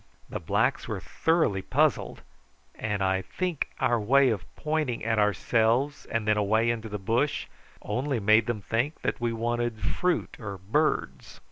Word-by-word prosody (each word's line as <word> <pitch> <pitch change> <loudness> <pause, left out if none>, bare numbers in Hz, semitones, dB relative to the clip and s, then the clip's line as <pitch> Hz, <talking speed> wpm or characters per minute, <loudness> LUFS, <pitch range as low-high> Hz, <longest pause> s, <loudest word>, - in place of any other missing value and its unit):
The - - -4
blacks - - 0
were - - -3
thoroughly 160 - +1
puzzled, - - +1 0.5
and 105 -2 -2
I 95 0 +1
think 175 - -3
our 120 -1 +2
way 135 +4 +4
of 100 -5 -3
pointing 150 -6 -1
at 110 -1 +1
ourselves 115 +7 +1
and 115 -2 -2
then 105 0 +3
away 110 +3 +2
into 115 -1 -4
the 105 - -3
bush 115 +9 0 0.4
only 125 +4 -1
made 110 +1 +4
them 115 -3 -2
think 120 +10 -1
that - - -2
we 120 -1 +1
wanted 120 0 -1
fruit 180 - -1
or 100 -4 -6
birds. 115 - -1
115 Hz, 155 wpm, -27 LUFS, 105-135 Hz, 0.5 s, way